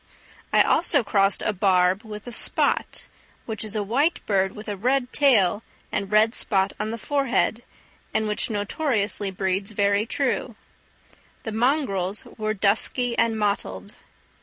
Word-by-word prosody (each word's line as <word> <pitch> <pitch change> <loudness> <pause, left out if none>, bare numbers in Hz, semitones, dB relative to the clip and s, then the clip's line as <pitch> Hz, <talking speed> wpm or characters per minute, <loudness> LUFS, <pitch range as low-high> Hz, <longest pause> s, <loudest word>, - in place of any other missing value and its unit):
I - - +5
also 295 -6 +2
crossed 195 -2 +1
a 215 - 0
barb 185 +1 +2
with 210 -2 -9
a 245 - -7
spot, - - 0 0.4
which 220 -2 -3
is 215 0 -2
a 210 - 0
white 275 - +1
bird 195 -2 +1
with 210 +1 -10
a 205 - -3
red 250 +5 0
tail 220 -9 +3 0.3
and 195 0 -3
red 215 +2 +4
spot 195 -4 0
on 215 - -2
the 230 - -4
forehead, 255 -3 0 0.5
and 220 0 0
which 210 +3 0
notoriously 205 -1 -1
breeds 190 +2 -2
very 200 +1 +1
true; 255 -2 -2 0.9
the 220 - -4
mongrels 215 - 0
were 215 0 -1
dusky 225 +4 +2
and 225 -1 +1
mottled. 205 -1 -2
215 Hz, 145 wpm, -24 LUFS, 200-235 Hz, 0.9 s, I